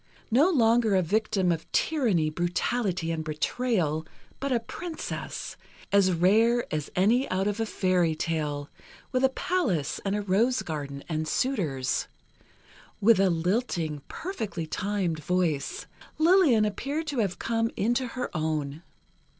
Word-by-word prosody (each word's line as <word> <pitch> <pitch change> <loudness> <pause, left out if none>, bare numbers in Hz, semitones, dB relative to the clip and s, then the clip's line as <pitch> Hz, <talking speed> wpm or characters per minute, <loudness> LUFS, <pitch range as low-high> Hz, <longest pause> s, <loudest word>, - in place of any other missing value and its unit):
No 280 +10 +5
longer 230 - +3
a 185 - +3
victim 200 0 +1
of 165 -1 -4
tyranny, 215 - +1
brutality 175 +1 -1
and 160 -1 -2
betrayal, 160 0 0 0.4
but 275 0 -2
a 245 - +3
Princess, 325 +8 -6 0.3
as 200 -2 +4
rare 220 +8 +3
as 150 -1 -2
any 230 +9 +3
out 190 +1 0
of 205 +1 -1
a 225 - 0
fairy 180 -5 +1
tale, 150 -3 -2 0.4
with 255 0 +1
a 265 - +6
palace 245 - -1
and 200 0 0
a 210 - -2
rose 225 +7 +2
garden 140 -3 -5
and 155 -1 -2
suitors, 160 - 0 0.9
with 220 0 +5
a 195 -1 +4
lilting, 170 - -1
perfectly 220 - -4
timed 185 -1 -2
voice, 170 -4 -1 0.3
Lillian 315 - +5
appeared 280 +10 -2
to 290 -5 -2
have 195 -5 0
come 230 0 0
into 240 +4 +1
her 250 -4 -5
own. 155 -2 -2
195 Hz, 135 wpm, -27 LUFS, 165-240 Hz, 0.9 s, a